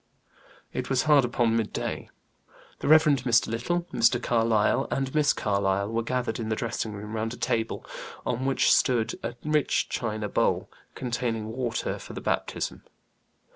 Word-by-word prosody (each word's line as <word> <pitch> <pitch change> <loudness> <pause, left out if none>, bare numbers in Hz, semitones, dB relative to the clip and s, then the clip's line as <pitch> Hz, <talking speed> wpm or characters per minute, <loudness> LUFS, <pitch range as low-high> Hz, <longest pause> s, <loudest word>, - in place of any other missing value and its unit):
It - - -3
was 130 -1 +2
hard 150 -3 +5
upon 120 -2 +1
midday. 110 -2 -2 0.7
The - - -3
Rev. 155 +1 +7
Mr. 130 -6 +3
Little, 120 +11 -1
Mr. 115 +1 +4
Carlyle, 115 -3 +2
and 135 0 -2
Miss 150 -1 +4
Carlyle 100 0 0
were 115 0 0
gathered 120 -1 -2
in 110 -1 -3
the 110 - +1
dressing 110 -1 -3
room, 105 +1 -7
round 110 +2 -2
a - - -15
table, 115 0 -1 0.4
on 125 +1 -1
which 135 0 +3
stood 120 -2 +2
a 115 +1 -4
rich 150 -2 +1
china 110 -2 -2
bowl, - - 0 0.2
containing 115 -3 -2
water 120 0 -2
for - - -10
the - - -5
baptism. - - -2
115 Hz, 155 wpm, -27 LUFS, 110-130 Hz, 0.7 s, Rev